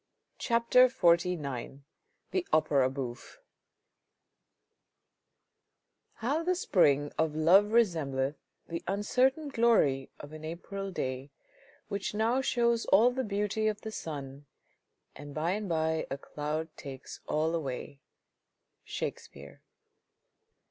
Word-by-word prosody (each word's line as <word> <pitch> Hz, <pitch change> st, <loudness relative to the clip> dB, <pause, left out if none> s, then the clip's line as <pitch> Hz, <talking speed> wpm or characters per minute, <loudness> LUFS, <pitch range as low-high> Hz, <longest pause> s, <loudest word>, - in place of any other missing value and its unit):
CHAPTER 235 Hz, +1 st, +4 dB
XLIX 170 Hz, -, +1 dB, 0.5 s
THE 370 Hz, -2 st, -1 dB
OPERA 140 Hz, -4 st, +3 dB
BOUFFE 130 Hz, -2 st, -6 dB, 2.8 s
How 280 Hz, +8 st, -1 dB
the 365 Hz, +2 st, +1 dB
spring 145 Hz, -, +3 dB
of 160 Hz, -1 st, +1 dB
love 175 Hz, +6 st, +6 dB
resembleth 150 Hz, -, +1 dB, 0.3 s
The 170 Hz, 0 st, -5 dB
uncertain 255 Hz, +9 st, +1 dB
glory 225 Hz, -, +2 dB
of 145 Hz, +1 st, -10 dB
an 155 Hz, 0 st, -9 dB
April 195 Hz, +5 st, -5 dB
day, 130 Hz, -6 st, -4 dB, 0.6 s
Whicli 200 Hz, +1 st, -3 dB
now 230 Hz, +5 st, +2 dB
shows 235 Hz, -2 st, +1 dB
all 225 Hz, +6 st, +6 dB
the 260 Hz, +1 st, -2 dB
beauty 210 Hz, 0 st, -1 dB
of 215 Hz, -1 st, -1 dB
the 220 Hz, -, -6 dB
sun, 145 Hz, -6 st, -7 dB, 0.7 s
And 145 Hz, 0 st, -10 dB
by 160 Hz, +3 st, 0 dB
and 205 Hz, 0 st, -3 dB
by 160 Hz, -1 st, 0 dB
a 135 Hz, -, -3 dB
cloud 155 Hz, +3 st, -4 dB
takes 135 Hz, -1 st, -9 dB
all 155 Hz, +2 st, 0 dB
away. 140 Hz, -3 st, -4 dB, 0.4 s
— -, -, -53 dB
Shakespeare. 70 Hz, +1 st, -7 dB
170 Hz, 110 wpm, -30 LUFS, 145-220 Hz, 2.8 s, love